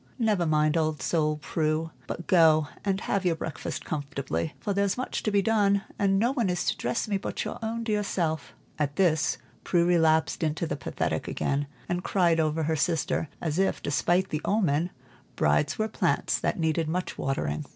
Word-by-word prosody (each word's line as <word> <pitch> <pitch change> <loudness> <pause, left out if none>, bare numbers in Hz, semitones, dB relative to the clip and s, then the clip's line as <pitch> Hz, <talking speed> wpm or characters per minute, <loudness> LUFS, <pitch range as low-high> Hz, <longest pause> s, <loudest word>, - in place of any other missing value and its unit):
"Never 210 -8 +1
mind 155 -1 +3
the 165 - +2
old 155 -1 0
soul, 155 -2 +1
Prue, 155 0 -1 0.2
but 170 - -5
go 160 -4 +5 0.2
and 195 0 0
have 200 -1 0
your 175 -3 +2
breakfast 160 -1 -5
comfortably, 140 - -3
for 205 - -2
there's 200 +1 +1
much 255 - -3
to - - 0
be 200 -1 +2
done, 200 -2 +3 0.2
and 195 -1 +3
no 235 +5 +2
one 235 -8 0
is 180 -1 0
to - - +1
dress 230 - -1
me 205 -2 +1
but - - -4
your - - -5
own 230 +1 -3
dear 215 -2 0
self." 165 -6 -2 0.2
At 145 -1 0
this 160 -4 +2 0.3
Prue 170 -2 +2
relapsed 160 -2 +3
into 160 +1 0
the - - -2
pathetic 145 - -2
again, 140 +1 -1 0.2
and 175 0 -2
cried 170 -4 +2
over 155 0 +1
her 160 +1 +1
sister 160 0 0
as 160 +1 -2
if, 195 - +1
despite 175 +6 +1
the 150 - -2
omen, 175 -5 +1 0.5
brides 150 +1 +2
were 215 - +1
plants 220 - 0
that - - -1
needed 160 0 +1
much 180 +3 -3
watering. 75 - -2
165 Hz, 190 wpm, -27 LUFS, 155-195 Hz, 0.5 s, go